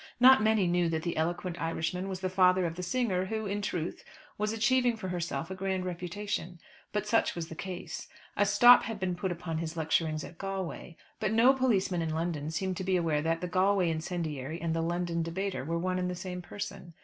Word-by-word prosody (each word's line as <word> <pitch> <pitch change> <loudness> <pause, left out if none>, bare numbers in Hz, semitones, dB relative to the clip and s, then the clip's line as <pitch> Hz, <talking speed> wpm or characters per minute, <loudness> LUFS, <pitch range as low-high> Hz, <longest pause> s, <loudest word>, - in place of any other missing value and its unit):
Not 255 -2 +8
many 215 -2 +3
knew 175 -1 +2
that 160 -1 -1
the 170 - -2
eloquent 175 +1 -2
Irishman 170 +3 -2
was 190 -1 -5
the 185 - 0
father 185 0 +4
of 165 - -2
the 180 - -6
singer 185 -1 0
who, 220 +2 -3
in 205 +1 -2
truth, 175 -4 -3 0.3
was 210 +1 -1
achieving 240 +1 +2
for 190 -4 -5
herself 170 -3 -3
a - - -1
grand 190 -1 -2
reputation. 180 0 -4 0.3
But 210 -1 -1
such 225 +2 +2
was 170 -1 -4
the 160 - -7
case. 185 +1 -6 0.3
A 205 - +3
stop 240 +5 +8
had 225 -2 -5
been 185 -2 -1
put 180 +1 -2
upon 165 -2 -3
his 165 0 -4
lecturings 160 -1 0
at 170 - -11
Galway; 190 -3 -5 0.2
but 215 -1 0
no 240 +4 +6
policeman 205 -9 +1
in 160 -1 -2
London 160 -3 -2
seemed 185 +3 -2
to 190 - -3
be 185 0 +2
aware 160 -4 +1
that 165 +1 0
the 180 - -2
Galway 185 -1 +2
incendiary 160 -3 -3
and 165 -1 -1
the 165 - 0
London 170 0 -1
debater 165 -3 -2
were 165 +4 -2
one 185 +2 -1
and 180 0 -1
the 180 - -3
same 180 0 -5
person. 175 -2 -7
180 Hz, 215 wpm, -30 LUFS, 165-195 Hz, 0.3 s, Not